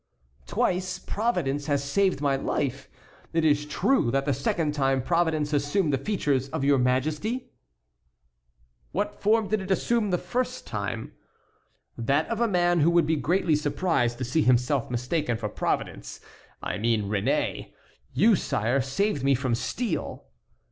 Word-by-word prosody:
"Twice 185 0 0
Providence 175 - -1
has 140 -2 +1
saved 185 +3 +1
my 140 -2 +2
life. 135 0 -2 0.4
It 165 -1 +2
is 150 -1 +2
true 205 - +2
that 135 +3 0
the 145 - +1
second 150 +3 0
time 135 -3 +1
Providence 160 -2 +1
assumed 145 +3 +1
the 135 - +1
features 140 - 0
of 135 - -3
your 140 -1 +4
Majesty?" 155 - -1 1.4
"What 205 +5 -1
form 215 +1 +3
did 215 -1 0
it 190 - -7
assume 215 +2 +1
the 180 - +2
first 250 +8 -3
time?" 110 +1 -4 0.9
"That 140 +6 +1
of 230 0 -2
a 235 - +3
man 175 -3 +2
who 155 +2 +4
would 170 -2 +4
be 160 +1 +1
greatly 160 +3 +1
surprised 145 -5 0
to 130 - -3
see 140 +7 +1
himself 125 0 +2
mistaken 125 +1 -1
for 110 -2 -4
Providence; - - -3 0.4
I - - -3
mean 115 -1 +1
Réné. 100 0 -1 0.4
You, 220 +1 +4
sire, 125 - 0
saved 140 +4 -1
me 135 0 +4
from 130 -1 -1
steel." 165 - -3
150 Hz, 150 wpm, -26 LUFS, 130-185 Hz, 1.4 s, your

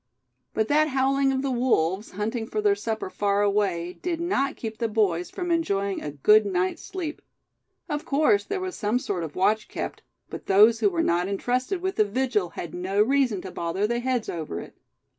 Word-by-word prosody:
But 220 0 +1
that 305 +3 +3
howling 270 0 +2
of 265 0 -1
the 275 - 0
wolves, 210 -6 +1
hunting 220 +3 -3
their 210 -2 +2
supper 220 +1 -3
far 200 +1 0
away, 190 -4 0
did 345 -2 -2
not 340 -6 0
keep 220 -1 -6
the 230 - +1
boys 200 -6 +1
from 355 -1 -4
enjoying 200 - 0
a 150 - -4
good 210 +10 +5
night's 185 -2 -1
sleep. 330 -5 -5 0.7
Of 295 -3 -3
course 310 +9 +3
there 400 -1 -3
was 370 0 -4
some 215 +2 0
sort 205 -9 -3
of 155 -2 -7
watch 210 +4 +2
kept; - - -5 0.3
but - - -9
those 215 +4 +6
who 410 - +4
were 335 -3 0
not 175 - +1
entrusted 250 - -1
with 380 0 -2
the 215 - +5
vigil 210 -3 0
had 170 - -5
no 185 +3 -2
reason 245 -3 +2
to 190 - -7
bother 170 +4 -1
their 235 +2 0
heads 250 -2 -1
over 155 - -4
it. - - -10
220 Hz, 195 wpm, -25 LUFS, 195-270 Hz, 0.7 s, those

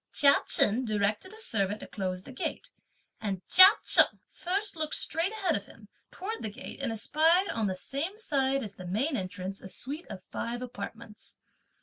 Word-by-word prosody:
Chia 280 -2 +5
Chen 225 +5 +4
directed 210 - -1
a 440 - -12
servant 210 - -1
to - - -7
close 185 -2 -4
the - - -11
gate, - - -5 0.5
and 195 -4 -5
Chia 370 +1 +10 0.2
Cheng - - +6
first 395 +3 -2
looked 310 -1 -2
straight 335 +5 +1
ahead 390 -7 -1
of 200 - -5
him 210 -2 -17 0.2
towards 430 +5 -6
the 220 - -3
gate 255 +5 -9
and 265 -4 -2
espied 320 - +2
on 220 -2 -1
the 190 - -2
same 290 - -4
side 275 - 0
as 200 -3 -9
the 185 - -9
main 255 - 0
entrance 190 -1 -5
a 190 - -10
suite 290 - -7
of 185 - -9
five 240 +1 -4
apartments. 225 -1 -10
245 Hz, 185 wpm, -28 LUFS, 205-325 Hz, 0.5 s, Chia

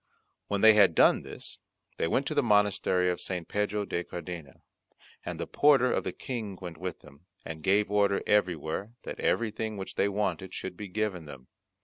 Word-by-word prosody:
When 100 -1 -1
they 110 0 +9
had 100 -6 +5
done - - +5
this, - - -7 0.4
they - - 0
went 135 +11 +1
to 145 - -2
the 145 - +3
monastery 105 -5 +2
of 90 - -4
St. 90 -3 -4
Pedro 105 +1 -1
de 85 -2 -2
Cardena, 85 -4 -8 0.6
and - - -5
the - - -2
porter 140 -4 +4
of - - 0
the - - -2
King 110 -7 -5
went 85 -4 -8
with 90 -1 -5
them, 75 +4 -18 0.2
and 80 -1 -6
gave 100 +4 +2
order 100 -1 +2
everywhere 95 +1 0
that - - -7
everything 110 -1 -1
which 95 - -6
they 100 - +1
wanted 95 -3 -2
should 95 - -5
be 105 +3 -7
given 95 -3 -2
them. 70 -3 -12
100 Hz, 190 wpm, -29 LUFS, 90-105 Hz, 0.6 s, they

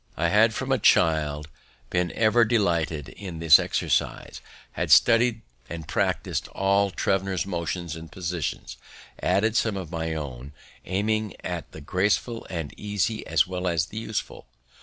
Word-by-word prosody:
I 85 +1 +1
had 110 +4 +4
from 135 0 -3
a 130 - +2
child 75 -3 +2 0.4
been 90 -2 0
ever 115 +1 +4
delighted 85 - 0
with 90 -5 -6
this 80 -2 +7
exercise, - - -1 0.3
had - - -3
studied 115 0 +5 0.3
and 80 -3 -7
practis'd - - -1
all 100 +1 +1
Thevenot's 95 0 -1
motions 85 -2 -3
and 80 0 -10
positions, 85 -8 -4 0.4
added 100 +5 +1
some 110 -3 +1
of 90 -4 -6
my 80 -1 -3
own, 70 -2 -7 0.3
aiming 105 +2 -1
at - - -5
the 80 - -10
graceful 105 +8 -1
and 80 -5 -5
easy 105 +1 -2
as 80 -3 +3
well 90 0 -4
as 80 -3 +1
the 110 - -7
useful. 110 - -5
90 Hz, 145 wpm, -25 LUFS, 80-105 Hz, 0.4 s, this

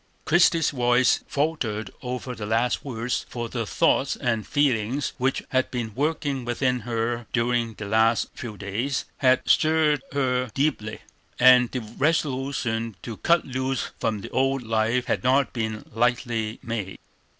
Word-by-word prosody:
Christie's 165 0 +4
voice 125 -1 +3
faltered 140 -8 -2
over 125 0 -4
the 105 -3 -6
last 115 +3 +1
words, 120 -2 -2
for 120 -1 -4
the 115 -3 -3
thoughts 135 - +2
and 115 -5 -1
feelings 135 -2 +1
which 130 +1 0
had 130 0 +1
been 120 -4 -4
working 145 -1 -1
within 125 +1 0
her 115 0 -2
during 115 -1 0
the 105 - -7
last 110 +2 +2
few 110 -4 -7
days 110 +8 -2
had 130 -1 +3
stirred 155 -2 +3
her 125 -3 0
deeply, 135 -7 -1 0.4
and 125 -1 +7
the 125 - -3
resolution 130 -3 -1
to 115 -3 -6
cut 170 -1 +2
loose 130 -1 -2
from 110 -3 -1
the 115 - -7
old 135 0 +1
life 115 +2 +1
had - - -1
not 130 0 +2
been 110 -2 -3
lightly 120 -1 0
made. 110 -5 -4
125 Hz, 145 wpm, -25 LUFS, 115-135 Hz, 0.4 s, and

